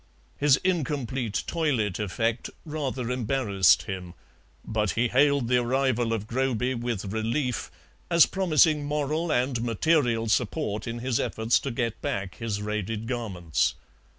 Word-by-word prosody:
His 145 -2 +4
incomplete 135 - -1
toilet 130 - 0
effect 115 +3 -1 0.2
rather 135 -5 -3
embarrassed 115 - +3
him, 90 -2 -6 0.5
but 110 -2 0
he 120 +1 +2
hailed 140 0 +3
the 125 +1 +3
arrival 125 -2 +1
of 110 -2 -2
Groby 125 +1 0
with 115 -5 -3
relief, 120 +3 -1 0.4
as 170 -1 +7
promising 160 -5 +3
moral 150 +3 -1
and 125 -2 +1
material 120 -1 +1
support 110 -1 -1
in 115 +1 -3
his 125 -3 +1
efforts 110 +2 +1
to 140 - -4
get 115 -2 -2
back 95 -3 -3
his 105 -3 -3
raided 105 +1 -3
garments. 100 -10 -1
120 Hz, 130 wpm, -26 LUFS, 110-140 Hz, 0.5 s, as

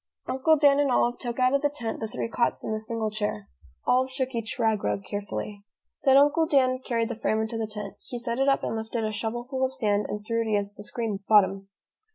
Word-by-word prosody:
Uncle 310 +5 +3
Dan 285 -1 +5
and 290 -1 +3
Olive 240 0 +2
took 240 -2 -4
out 255 0 +3
of 280 - +3
the 290 - +2
tent 240 -6 -4
the 220 - -3
three 215 - -3
cots 235 +1 0
and - - -2
the 215 - -1
single 220 0 -3
chair. 210 - -3 0.4
Olive 255 +1 +3
shook 260 0 -2
each 230 0 -3
rag 220 -3 +1
rug 200 - -1
carefully. 205 0 -5 0.4
Then 270 0 +7
Uncle 295 +3 +4
Dan 255 -3 +3
carried 235 -3 -1
the - - -2
frame 220 0 0
into 220 +1 -2
the 220 - -1
tent. 210 -2 -7
He 245 - -4
set 235 +1 -3
it 270 +1 +3
up 275 - +2
and - - -2
lifted 225 +1 -3
a 215 - -1
shovelful 240 +5 -3
of 260 0 0
sand 210 -5 +1
and 210 0 -5
threw 230 +1 0
it 225 - -2
against 205 -1 -1
the 205 - -9
screen 215 -2 -3
bottom. 195 -2 +4
230 Hz, 235 wpm, -26 LUFS, 215-260 Hz, 0.4 s, Then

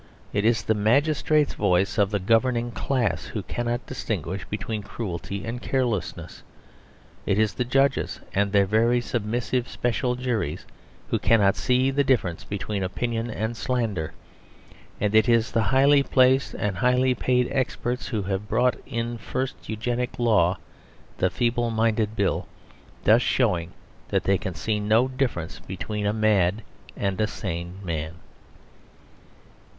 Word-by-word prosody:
It 105 +1 +1
is 115 0 +3
the 110 - +2
magistrates 145 +7 +2
voices 100 0 +1
of 100 -1 +4
the 105 - 0
governing 115 +4 +1
class 125 -1 -1
who 105 - -5
cannot 120 +3 -3
distinguish 95 - -4
between 105 +1 -3
cruelty 100 -1 -5
and 120 +2 -4
carelessness. 120 -9 -2 0.9
It 100 - +2
is 110 -1 +2
the 125 - -2
judges 135 +2 +1
(and 100 0 +1
their 100 -1 +4
very 115 +4 +3
submissive 120 +2 -2
special 125 +1 -1
juries) 115 - -2 0.4
who - - +1
cannot 100 -3 +4
see 130 +1 +2
the 140 +1 +2
difference 115 -11 +1
between 100 0 -4
opinion 115 +5 -2
and 110 +1 -3
slander. 110 -10 -2 0.9
And 105 0 0
it 110 +3 +5
is 115 0 +3
the 115 - +2
highly 140 +2 +5
placed 130 0 +3
and 100 -3 -2
highly 125 +1 +3
paid 125 0 +1
experts 125 -2 -2
who 110 -5 -2
have 100 +2 -3
brought 125 +3 +2
in 115 -2 -2
the 120 - -7
first 105 -7 -4
Eugenic 120 +3 -2
Law, 100 -7 +3 0.6
the 95 - +3
Feeble 120 +3 0
Minded 110 -1 +1
Bill 100 -3 0 0.6
thus - - +5
showing 85 -1 +1 0.4
that - - 0
they 95 -1 +2
can 95 - -5
see 110 -2 -1
no 110 +4 +3
difference 130 - -2
between 100 +3 -4
a - - +2
mad 105 -2 +2 0.3
and 100 +1 -1
a 105 - +2
sane 85 -4 -5
man. 80 -2 -3
110 Hz, 145 wpm, -25 LUFS, 100-125 Hz, 0.9 s, it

